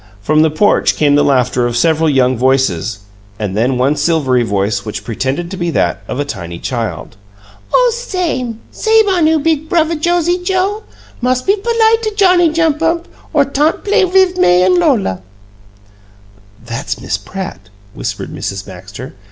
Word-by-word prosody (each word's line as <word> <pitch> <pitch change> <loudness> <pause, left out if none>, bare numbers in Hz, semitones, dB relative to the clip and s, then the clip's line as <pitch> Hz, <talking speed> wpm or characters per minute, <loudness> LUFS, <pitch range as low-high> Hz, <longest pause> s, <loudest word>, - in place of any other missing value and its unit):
From 155 +9 +2
the 160 - +4
porch 205 +7 +2
came 145 -2 +2
the 145 - +4
laughter 125 -2 +1
of 120 0 -2
several 160 +3 +2
young 130 -2 +2
voices, 120 -5 0 0.4
and 100 -3 -4
then 125 +4 +1
one 135 +4 +2
silvery 145 -7 +1
voice, 100 -2 -1
which 105 - -6
pretended 135 - -3
to 190 - -5
be 175 -1 -2
that 95 - 0
of 130 - -4
a 145 - -1
tiny 85 -10 -6
child. 115 0 -5 0.5
"Oh, - - +4
s'ame! 350 - -3 0.2
S'ame 445 -1 +3
on 350 -5 +2
'oo, 320 0 +3
big 315 0 -1
Bruvva 330 -1 +1
Josie 350 +1 +1
Joe! 385 +3 0 0.4
Mus' 255 +1 0
be 395 - +2
polite 450 +1 +2
to 430 -1 -3
Johnny 365 -4 +4
Jump 320 -1 0
up, 335 +1 0 0.2
or 290 -3 +3
tant 290 +3 0
play 415 0 +2
wiv 370 0 +2
May 180 - +4
and - - +3
Lola!" 225 - +1 1.4
"That's 115 0 -4
Miss 95 - -3
Pratt," 110 - -8 0.2
whispered - - -5
Mrs. 100 0 -5
Baxter. 100 +6 -10
180 Hz, 165 wpm, -15 LUFS, -, 1.4 s, the